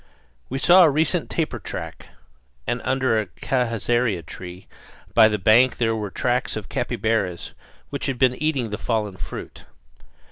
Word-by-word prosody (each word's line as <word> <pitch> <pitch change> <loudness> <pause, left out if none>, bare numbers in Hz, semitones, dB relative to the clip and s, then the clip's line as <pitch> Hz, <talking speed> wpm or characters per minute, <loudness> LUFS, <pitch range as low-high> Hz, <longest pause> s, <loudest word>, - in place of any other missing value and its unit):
We 135 - -3
saw 175 +7 +6
a 165 - +7
recent 150 +1 0
tapir - - -2
track; - - -7 0.6
and - - -2
under 130 -4 +1
a 105 - -7
cajazeira 115 -2 -1
tree 90 +2 -9 0.5
by 110 - +7
the 105 -1 0
bank 110 +6 +4
there 115 -2 +1
were 105 -2 -4
the - - -25
tracks 125 0 0
of 110 -3 -6
capybaras 110 -6 -2 0.4
which - - -3
had 135 -2 -2
been 125 0 +4
eating 135 -6 -1
the 105 - -4
fallen 105 -4 -2
fruit. - - -8
115 Hz, 155 wpm, -23 LUFS, 105-130 Hz, 0.6 s, a